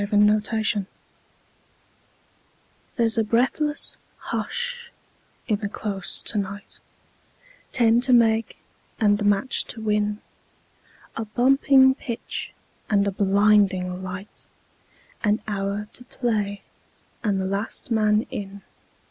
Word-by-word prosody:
Vitaï 210 +1 +2
Lampada 205 -3 +1 2.1
There's 230 -1 +3
a - - +3
breathless 255 +7 0 0.2
hush 485 0 -4 0.6
in 210 -4 +1
the 205 -1 -3
Close 200 -3 -3
to 210 - 0
night 200 +1 -6 0.9
Ten 235 -2 +4
to 255 +1 +1
make 225 -2 +3 0.4
and 205 -2 +3
the - - -2
match 205 +6 +2
to 230 - -5
win 210 -1 0 1.0
A 225 - -3
bumping 265 +3 +4
pitch 235 -3 -5 0.4
and 200 -1 +3
a 200 - 0
blinding 195 -2 +2
light, 190 +2 -8 0.8
An 210 0 +2
hour 200 0 -2
to 245 - -7
play 210 -6 -2 0.6
and 200 -3 +1
the 190 - -1
last 200 +5 -4
man 215 -1 +3
in. 200 0 -7
210 Hz, 110 wpm, -24 LUFS, 200-230 Hz, 2.1 s, Ten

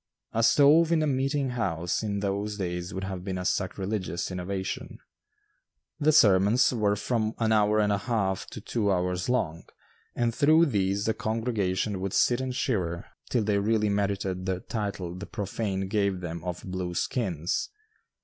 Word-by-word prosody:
A 115 - +1
stove 150 +7 +5
in 160 -2 +3
a - - +2
meeting 135 -1 0
house 90 -8 -1
in 100 -2 -2
those 100 +1 -2
days 90 -1 -3
would 95 - -5
have 95 -2 -5
been 95 -1 -3
a 90 - -4
sacrilegious 95 -1 -2
innovation. 95 +1 -4 1.0
The 155 0 +4
sermons 105 +1 +5
were 105 -3 +2
from 110 +1 -1
an 110 -1 +1
hour 105 0 +3
and 105 -1 +2
one 100 - +1
half 100 -4 -1
to - - -8
two 105 -1 0
hours 90 +2 -1
long, 85 -10 -1 0.5
and 120 -1 +1
through 155 +5 +5
these 100 - 0
the 110 - +2
congregation 110 -4 -1
would 95 0 -3
sit 120 +1 +3
and 130 -1 -3
shiver 90 -10 -1 0.2
till 120 - +1
they 100 -1 +1
really 105 +1 +1
merited 100 -2 -1
the 95 -1 -1
title 100 -6 -4
the 90 +3 -7
profane 100 -2 -3
gave 100 -2 0
them 85 -2 -5
of 90 0 -5
"blue 90 -1 -4
skins." 90 - -1
100 Hz, 165 wpm, -27 LUFS, 95-115 Hz, 1.0 s, stove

